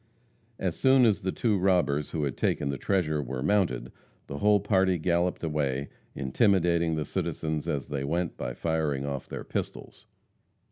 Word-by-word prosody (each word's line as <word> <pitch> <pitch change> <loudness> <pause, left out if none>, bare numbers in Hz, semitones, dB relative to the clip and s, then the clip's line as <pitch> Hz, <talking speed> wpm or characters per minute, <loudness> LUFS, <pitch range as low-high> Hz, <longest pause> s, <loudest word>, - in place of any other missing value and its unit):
As 90 -3 -2
soon 130 -1 +5
as 110 -3 +2
the 95 - -1
two 105 -2 +1
robbers 85 -6 +2
who 80 - -2
had 70 -3 -2
taken 70 - 0
the 70 -2 -3
treasure 80 -6 0
were 65 -1 -4
mounted, 75 -10 +1 0.3
the 70 - -6
whole 105 0 +4
party 95 -2 +2
galloped 85 +2 0
away, 70 -3 -1 0.3
intimidating 85 - +2
the 75 -1 -2
citizens 80 +2 -3
as 70 -2 -1
they 70 -1 -2
went 85 +4 -1
by - - -5
firing 80 -4 -1
off 70 -2 -5
their - - -5
pistols. - - -6
80 Hz, 160 wpm, -28 LUFS, 70-95 Hz, 0.3 s, soon